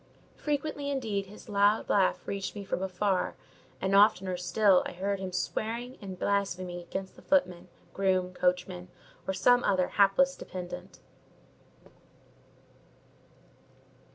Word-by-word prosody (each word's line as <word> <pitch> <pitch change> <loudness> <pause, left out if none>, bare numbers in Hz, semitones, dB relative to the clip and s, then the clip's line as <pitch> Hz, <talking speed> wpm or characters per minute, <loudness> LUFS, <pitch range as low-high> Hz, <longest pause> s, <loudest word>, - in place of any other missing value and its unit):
Frequently, 290 -1 -2
indeed, 220 -8 -2
his 210 +4 -13
loud 205 +1 +3
laugh 195 -2 +2
reached 195 0 -3
me 200 -1 -6
from 190 - -2
afar; 190 0 0 0.4
and 190 +1 +1
oftener 190 -2 +4
still 185 +2 +3
I - - -7
heard 195 +2 -2
him 190 -1 -4
swearing 230 +7 -3
and 190 -2 -7
blaspheming 185 -3 -1
against 190 +2 -6
the - - -15
footmen, 180 -12 +1 0.3
groom, 185 -2 +1
coachman, 180 0 -1 0.4
or 190 - 0
some 245 +3 +4
other 185 -2 +2
hapless 210 +8 +4
dependant. 180 0 -8
195 Hz, 120 wpm, -29 LUFS, 180-210 Hz, 0.4 s, oftener